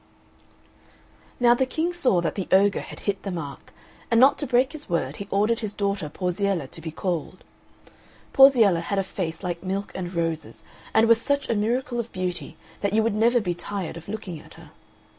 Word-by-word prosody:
Now 240 -1 +6
the 260 +2 +1
King 325 +6 -1
saw 255 - +2
that 160 -3 -1
the 195 - -4
ogre 195 +1 +4
had - - -10
hit 200 -2 -2
the 200 - -5
mark; 160 -6 -7 0.4
and 230 -1 +4
not 265 +3 +6
to 290 - -1
break 255 +2 +3
his 300 -6 -8
word 155 -5 -1
he 200 - -7
ordered 210 +4 +1
his 215 -3 -4
daughter 200 -6 -1
Porziella 180 -1 -1
to 165 - -9
be 160 - -5
called. 175 +2 -4 0.9
Porziella 240 -10 +6
had 200 +4 -3
a 195 - +2
face 185 -2 -5
like 175 -2 -3
milk 195 +2 -3
and 180 -1 -5
roses, 165 -2 -3 0.3
and 225 +1 +4
was 230 0 +5
such 280 +1 0
a 230 - +2
miracle 240 +3 -1
of 235 0 -4
beauty 180 -1 -4 0.2
that 200 0 -1
you 220 +1 +3
would 225 - +1
never 235 +3 +3
be 180 -5 -1
tired 180 0 -5
of 170 0 -10
looking 200 -6 -6
at - - -15
her. - - -15
200 Hz, 200 wpm, -25 LUFS, 175-230 Hz, 0.9 s, Now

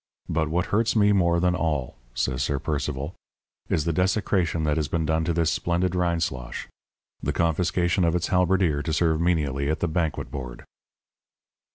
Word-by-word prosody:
But 80 -1 0
what 85 +2 0
hurts 115 +2 +2
me 105 -2 +5
more 85 -4 +3
than 90 0 +2
all,' 75 -7 -1 0.2
says 65 -1 -1
Sir 70 +1 0
Percival, 75 +1 -3 0.6
'is 75 - +1
the 85 - 0
desecration 90 -2 +1
that 75 -1 +1
has 75 -2 0
been 80 +2 -1
done 80 +1 +1
to 85 - +1
this 85 -1 +1
splendid 85 +1 0
Rindslosh 85 -8 -2 0.6
the - - -1
confiscation 85 +2 +1
of 85 0 +2
its 90 - -1
halberdier 90 -4 +2
to 80 +1 -2
serve 80 0 +2
menially 75 -5 +1
at 80 - 0
the 85 - 0
banquet 80 -1 -2
board.' 65 -4 -7
85 Hz, 170 wpm, -25 LUFS, 75-90 Hz, 0.6 s, me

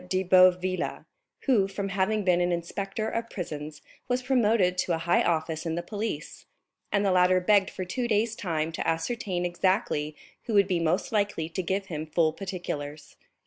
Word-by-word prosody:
de 185 0 +1
Boville, 185 0 +3 0.4
who, 225 -8 +3
from 195 0 -4
having 195 +2 0
been 180 -2 +3
an 175 0 +1
inspector 195 +5 -3
of 230 +1 -3
prisons, 150 -4 -6 0.2
was 250 0 0
promoted 225 -8 +3
to 180 -1 0
a 165 - -6
high 175 - +4
office 160 -1 0
in 165 -2 -2
the 175 - -3
police; 205 -5 -5 0.4
and 205 0 +2
the 195 - +3
latter 185 0 +4
begged 200 +1 +3
for 185 - -5
two 240 +7 -2
days 220 0 +1
time 165 -5 -2
to 160 - -4
ascertain 180 +1 -1
exactly 175 -4 0 0.3
who 225 - -2
would 200 -2 +5
be 180 -3 +1
most 165 +2 0
likely 205 -7 0
to 170 +3 -3
give 190 +3 -2
him 155 -4 -5
full 155 0 +2
particulars. 155 -6 -6
185 Hz, 180 wpm, -27 LUFS, 165-205 Hz, 0.4 s, would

